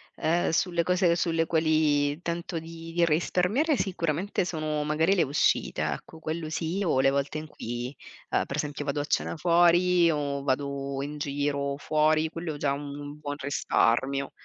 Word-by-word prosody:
ehm, 170 +2 +1
sulle 170 +1 +1
cose 180 0 +3
sulle 165 -1 +1
quali 155 -2 +2
tento 170 0 -3
di 165 0 -9
di 175 0 +2
risparmiare, 180 - +1
sicuramente 180 -1 -1
sono 155 -3 -2
magari 160 +5 +2
le 180 - +3
uscite 145 0 +1
ecco, 160 - -4
quello 160 0 -4
sì 165 +4 -2
o 135 -6 +2
le 135 - +4
volte 140 +2 -1
in 155 - -8
cui, 120 -2 -5 0.4
ehm, - - +1
per 140 - -5
esempio 145 -1 -3
vado 145 0 -1
a - - -3
cena 150 - -1
fuori 175 +1 +4
o 140 -2 -2
vado 140 0 -2
in 145 +2 -5
giro 140 -1 -1
fuori, 155 +1 +2
quello 165 0 -5
è - - -7
già 145 -1 0
un 145 +1 -7
buon 145 -1 -4
risparmio 140 -1 +1
155 Hz, 165 wpm, -27 LUFS, 145-170 Hz, 0.4 s, le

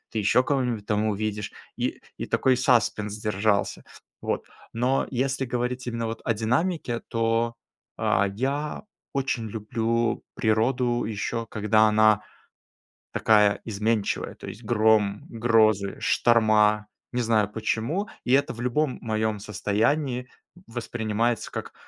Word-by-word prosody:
ты - - +2
ещё 105 +5 +3
кого-нибудь 125 -7 0
там 105 0 +1
увидишь, 105 0 -2 0.3
и - - -1 0.2
и - - -2
такой 130 -1 +2
саспенс 115 -4 +1
держался. 105 -1 0 0.4
Вот. - - -2 0.3
Но 125 +4 +1
если 135 +1 0
говорить 125 +1 -2
именно 115 -1 -2
вот 115 - -5
о 115 - +1
динамике, 120 - -1
то, 115 +1 0 0.4
а, 100 +1 +2
я 140 - -2 0.3
очень 130 -5 -1
люблю 115 +2 -1
природу 120 +2 +1
ещё, 115 +2 -3
когда 110 0 +3
она 110 0 +4 0.9
такая 105 -2 +4
изменчивая. 110 0 -1
То - - -11
есть 105 - -8
гром, 110 -2 +2
грозы, 110 -4 +2
шторма, 105 -2 +3 0.3
не 125 - 0
знаю 110 -3 +2
почему. 115 - -1 0.2
И - - +1
это 140 +1 +3
в 120 - -8
любом 125 +3 0
моём 110 -2 -1
состоянии 120 +6 0 0.4
воспринимается 115 -1 -2
как: - - -6
115 Hz, 125 wpm, -25 LUFS, 105-125 Hz, 0.9 s, она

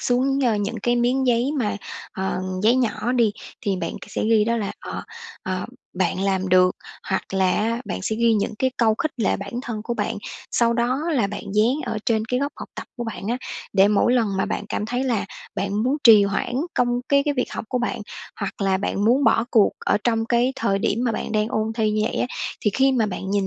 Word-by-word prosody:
xuống, 260 +2 +1
ơ, 230 -3 +3
những 205 +3 -2
cái 240 0 +2
miếng 255 +2 +2
giấy 245 +2 +2
mà, 210 -5 0 0.4
ờ, 190 -1 -2 0.2
giấy 230 +4 +5
nhỏ 245 0 0
đi, 235 -4 +3 0.3
thì 195 -2 -1
bạn 170 -2 -3
k - - -12
sẽ - - -2
ghi 220 -1 +4
đó 235 +1 +1
là, 205 -3 -2
ờ, - - -6 0.4
ờ, 185 -1 -3 0.3
bạn 185 0 0
làm 190 -1 0
được, 185 0 +4 0.3
hoặc 190 - +1
là 190 -1 +3
á 230 +5 0
bạn - - -4
sẽ 220 - -1
ghi 230 -1 +3
những 210 +1 -1
cái 260 0 +2
câu 220 -2 +3
khích 310 +5 -1
lệ 220 -5 +1
bản 200 +2 -7
thân 220 -5 -4
của 240 +1 -3
bạn, - - -2 0.3
sau 235 -1 +3
đó 245 +5 0
là 245 -9 +2
bạn 205 - -6
dán 225 +5 +4
ở 220 - -2
trên 220 -2 +2
cái 250 +3 -1
góc 285 +1 -1
học - - -8
tập - - -7
của 240 - -4
bạn 225 -3 -6
á 240 - +1 0.4
để 195 0 +5
mỗi 210 +4 +3
lần 235 -4 +3
mà 190 - +1
bạn - - -3
cảm 210 - -2
thấy 250 +3 -1
là 235 -6 0 0.3
bạn 200 +2 -1
muốn 265 +4 +1
trì 215 -3 +9
hoãn 200 +5 -1 0.2
công 245 0 +1
cái 280 0 +4
cái 290 -1 0
việc 250 - -1
học - - -4
của 250 - 0
bạn, 245 - -2 0.4
hoặc 200 - -4
là 195 -1 +2
bạn 200 +1 -1
muốn 255 +5 +4
bỏ 225 +1 +4
cuộc 215 -4 +5
ở - - +3
trong 225 -2 +2
cái 240 +2 +2
thời 195 -3 +1
điểm 210 - 0
mà 230 - +1
bạn 215 - -4
đang 215 +1 +1
ôn 220 0 -1
thi 220 -2 +1
như 215 0 +1
vậy - - -2
á, - - +1 0.3
thì 210 - +2
khi 270 0 +4
mà 230 -4 +2
bạn 190 0 -4
nhìn 200 -1 +1
225 Hz, 245 wpm, -23 LUFS, 205-245 Hz, 0.4 s, trì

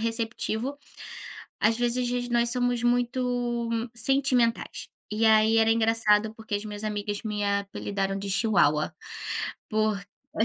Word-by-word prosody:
receptivo, 230 +3 -1 0.8
às 220 +2 +3
vezes 240 0 +3
a 245 - -1
gen 245 0 -2
nós 235 0 +2
somos 245 -1 0
muito 245 -1 0 0.3
sentimentais. 255 -2 +1 0.2
E, 215 +2 +1
aí, 220 0 +5
era 225 0 +4
engraçado 220 -1 +2
porque 220 -2 -4
as 205 - -4
minhas 210 0 -6
amigas 205 -1 -3
me 210 -2 -2
apelidaram 200 -1 -2
de 195 0 -5
Chihuahua. 175 -8 +2 0.8
Por 215 -1 +1 0.4
É 220 - +3
225 Hz, 130 wpm, -26 LUFS, 210-240 Hz, 0.8 s, aí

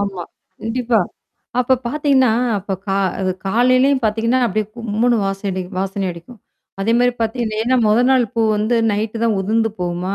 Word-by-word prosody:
ஆமா. 195 -3 -3 0.4
கண்டிப்பா. 230 0 0 0.6
அப்ப 255 +1 +3
பாத்தீங்கன்னா 270 -2 +2 0.3
அப்ப 195 0 -5 0.2
கா 195 - +1 0.2
அது 185 -1 0 0.2
காலையிலயும் 255 +5 +3
பாத்தீங்கன்னா, 230 +4 +1
அப்டியியே 215 0 -1
கும்முன்னு 235 +1 +1
வாசம் 195 +1 -3
அடி 185 0 -3 0.2
வாசனை 195 0 -2
அடிக்கும். 175 +7 -13 0.4
அதே 220 +4 +1
மாரி 245 0 +3
பாத்தீ 225 +2 -1
இது 215 -1 -3
ஏன்னா 255 +3 +2
மொத 210 +1 +4
நாள் 260 -2 +4
பூ 230 - +1
வந்து 215 +3 +1
நைட்டு 210 +2 -2
தான் 225 -2 +2
உதுந்து 225 +3 +1
போகுமா? 180 +2 -2
225 Hz, 165 wpm, -19 LUFS, 200-245 Hz, 0.6 s, மொத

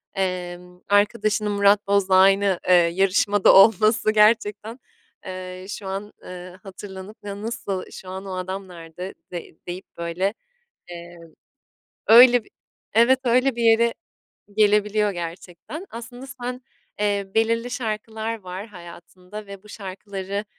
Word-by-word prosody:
Emm, 180 -1 -4
arkadaşının 210 +1 +2
Murat 200 0 +3
Boz'la 200 -1 +2
aynı, 195 0 +4
eee, 185 - +5
yarışmada 190 +3 +4
olması 215 +2 +5
gerçekten, 215 +1 +2 0.5
eee, 185 0 -7
şu 205 -1 -6
an, 195 +2 -5
eee, 180 0 -10
hatırlanıp 195 +1 -10
"Ya, 200 0 -7
nasıl 205 -4 -4
şu 185 - -10
an 190 +1 -7
o 190 -1 -5
adam 190 +1 -5
nerede?" 175 +1 -9 0.2
de 175 -2 -8
deyip 180 +2 -6
böyle, 170 +4 -2 0.6
eee, 175 0 -10 0.9
öyle 245 +1 +8
bir - - -23 0.4
Evet, 245 +4 +4
öyle 250 +1 +2
bir 235 - -2
yere 230 +1 +4 0.6
gelebiliyor 210 0 +3
gerçekten. 175 - -8
Aslında 245 +3 -9 0.2
sen 250 +1 -5 0.4
Eee, 200 -1 0
belirli 230 +2 +1
şarkılar 220 -1 -4
var 185 +2 -7
hayatında 180 +1 -12
ve 200 -1 -10
bu 210 - -17
şarkıları, 195 0 -6
200 Hz, 125 wpm, -23 LUFS, 185-220 Hz, 0.9 s, öyle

